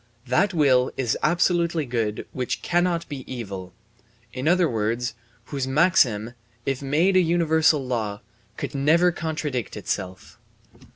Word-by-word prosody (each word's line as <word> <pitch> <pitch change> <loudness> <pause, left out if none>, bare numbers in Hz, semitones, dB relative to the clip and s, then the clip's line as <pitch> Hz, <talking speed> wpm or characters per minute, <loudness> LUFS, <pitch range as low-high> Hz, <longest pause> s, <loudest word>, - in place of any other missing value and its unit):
That 175 +11 +2
will 135 -7 +3
is 125 -4 0
absolutely 170 -2 +1
good 115 -4 -2
which 125 -1 -3
cannot 175 -1 +1
be 140 -3 -6
evil 100 -7 -6 0.6
in 130 +3 -3
other 175 +1 +4
words, 115 0 -1 0.3
whose 135 0 -3
maxim, 130 - +3 0.3
if 135 -1 -1
made 155 +8 +2
a 185 - +6
universal 160 -4 +2
law, 110 -5 -3 0.4
could - - -4
never 160 +6 +3
contradict 155 - -3
itself. 95 0 -5
140 Hz, 125 wpm, -24 LUFS, 120-170 Hz, 0.6 s, a